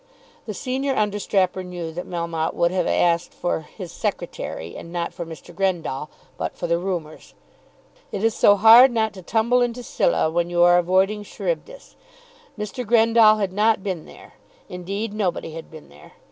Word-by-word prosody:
The 215 Hz, -, -5 dB
senior 265 Hz, +4 st, -2 dB
understrapper 200 Hz, -3 st, 0 dB
knew 175 Hz, -3 st, -6 dB
that 175 Hz, +3 st, -7 dB
Melmotte 170 Hz, -2 st, -3 dB
would 170 Hz, 0 st, +2 dB
have 185 Hz, 0 st, 0 dB
asked 170 Hz, 0 st, +1 dB
for 175 Hz, -, -1 dB
"his 170 Hz, +3 st, -10 dB
Secretary," 80 Hz, +1 st, -5 dB
and 170 Hz, -, -9 dB
not 170 Hz, -1 st, -3 dB
for 170 Hz, -3 st, -6 dB
Mr. 165 Hz, +1 st, -11 dB
Grendall, 170 Hz, -6 st, -2 dB, 0.3 s
but -, -, -4 dB
for -, -, -4 dB
the 170 Hz, 0 st, +1 dB
rumours. 175 Hz, -4 st, -5 dB, 0.8 s
It 200 Hz, -, -4 dB
is 225 Hz, -1 st, +3 dB
so 205 Hz, -, +5 dB
hard 225 Hz, +5 st, +8 dB
not 220 Hz, -2 st, 0 dB
to 190 Hz, -, -10 dB
tumble 230 Hz, +6 st, +1 dB
into 245 Hz, 0 st, -1 dB
Scylla 165 Hz, -7 st, +1 dB
when 170 Hz, +1 st, 0 dB
you 175 Hz, 0 st, +3 dB
are 175 Hz, 0 st, +6 dB
avoiding 190 Hz, +4 st, +1 dB
Charybdis. -, -, -5 dB, 0.6 s
Mr. 210 Hz, +4 st, -5 dB
Grendall 225 Hz, -1 st, +5 dB
had 195 Hz, -3 st, -2 dB
not 210 Hz, 0 st, +2 dB
been 185 Hz, -6 st, -4 dB
there. -, -, -15 dB, 0.4 s
Indeed, 200 Hz, +4 st, -4 dB
nobody 185 Hz, -6 st, -2 dB
had 165 Hz, +1 st, -9 dB
been 155 Hz, -1 st, -13 dB
there. 75 Hz, +1 st, -17 dB
190 Hz, 170 wpm, -22 LUFS, 170-220 Hz, 0.8 s, hard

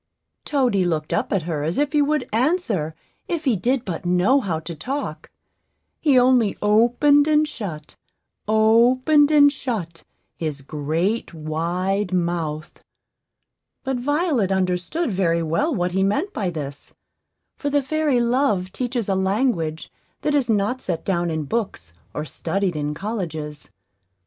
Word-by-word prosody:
Toady 250 Hz, -10 st, +2 dB
looked 160 Hz, -3 st, -1 dB
up 245 Hz, +4 st, -1 dB
at 195 Hz, -5 st, +1 dB
her 160 Hz, -3 st, -3 dB
as 160 Hz, +3 st, -2 dB
if 290 Hz, +1 st, 0 dB
he 295 Hz, -, +4 dB
would 300 Hz, +1 st, 0 dB
answer 225 Hz, -, 0 dB, 0.3 s
if 335 Hz, -3 st, -3 dB
he 255 Hz, -5 st, +3 dB
did 245 Hz, +6 st, 0 dB
but 185 Hz, -1 st, -4 dB
know 180 Hz, +10 st, +3 dB
how 175 Hz, -10 st, -2 dB
to 165 Hz, +1 st, -7 dB
talk; 265 Hz, -, -5 dB, 0.7 s
he 285 Hz, -5 st, +3 dB
only 250 Hz, -4 st, +4 dB
opened 245 Hz, +8 st, +4 dB
and 305 Hz, 0 st, +3 dB
shut, 170 Hz, -, -7 dB, 0.5 s
opened 245 Hz, +7 st, +4 dB
and 290 Hz, -2 st, +6 dB
shut, 185 Hz, -, -5 dB, 0.3 s
his 150 Hz, -4 st, -4 dB
great 160 Hz, +9 st, -2 dB
wide 175 Hz, +5 st, -2 dB
mouth; 165 Hz, -3 st, -3 dB, 1.0 s
but 265 Hz, -1 st, -1 dB
Violet 285 Hz, -, 0 dB
understood 190 Hz, -, 0 dB
very 170 Hz, -3 st, +1 dB
well 165 Hz, -, 0 dB
what 180 Hz, -, -1 dB
he 190 Hz, +2 st, 0 dB
meant 280 Hz, -, 0 dB
by 195 Hz, -4 st, -1 dB
this; 145 Hz, -4 st, -7 dB, 0.6 s
for 285 Hz, -, -3 dB
the 285 Hz, -1 st, +1 dB
fairy 295 Hz, -2 st, +1 dB
Love 235 Hz, -6 st, +1 dB
teaches 245 Hz, -2 st, -2 dB
a 195 Hz, -, +1 dB
language 190 Hz, -5 st, 0 dB, 0.3 s
that 295 Hz, -, 0 dB
is 275 Hz, -5 st, +1 dB
not 215 Hz, +4 st, +1 dB
set 170 Hz, -7 st, -3 dB
down 175 Hz, -3 st, 0 dB
in 160 Hz, -1 st, -2 dB
books 145 Hz, -, -4 dB, 0.2 s
or 150 Hz, -, -3 dB
studied 190 Hz, +2 st, -2 dB
in 150 Hz, 0 st, -2 dB
colleges. 160 Hz, -7 st, -5 dB
200 Hz, 145 wpm, -22 LUFS, 170-260 Hz, 1.0 s, and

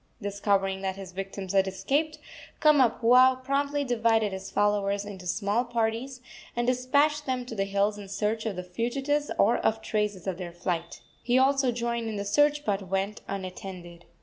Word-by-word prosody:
Discovering 200 Hz, -2 st, 0 dB
that 190 Hz, -1 st, -2 dB
his 195 Hz, -2 st, -9 dB
victims 195 Hz, 0 st, -5 dB
had 195 Hz, -1 st, +4 dB
escaped, 275 Hz, +12 st, -1 dB, 0.4 s
Kamapuaa 255 Hz, -3 st, +5 dB
promptly 280 Hz, +2 st, 0 dB
divided 225 Hz, -4 st, +1 dB
his 190 Hz, 0 st, -6 dB
followers 205 Hz, -1 st, +1 dB
into 190 Hz, -3 st, -8 dB
small 205 Hz, +5 st, 0 dB
parties, 240 Hz, +2 st, -2 dB, 0.3 s
and 240 Hz, 0 st, 0 dB
despatched 285 Hz, +4 st, +2 dB
them 255 Hz, -1 st, -1 dB
to 245 Hz, -, -7 dB
the 195 Hz, -3 st, -1 dB
hills 200 Hz, +1 st, 0 dB
in 200 Hz, -1 st, -9 dB
search 215 Hz, +3 st, -1 dB
of 205 Hz, -, -3 dB
the 180 Hz, -, -4 dB
fugitives 270 Hz, +10 st, -1 dB
or 225 Hz, +4 st, +4 dB
of 220 Hz, -, +1 dB
traces 210 Hz, -4 st, -2 dB
of 190 Hz, -2 st, -3 dB
their 175 Hz, -2 st, -6 dB
flight. 170 Hz, -1 st, -3 dB, 0.2 s
He 245 Hz, 0 st, +2 dB
also 270 Hz, -1 st, +3 dB
joined 235 Hz, -1 st, -2 dB
in 220 Hz, -, -4 dB
the 200 Hz, 0 st, -3 dB
search, 295 Hz, +7 st, +2 dB
but 195 Hz, -2 st, -1 dB
went 195 Hz, +3 st, -2 dB
unattended. 185 Hz, -2 st, -7 dB
210 Hz, 170 wpm, -27 LUFS, 195-255 Hz, 0.4 s, Kamapuaa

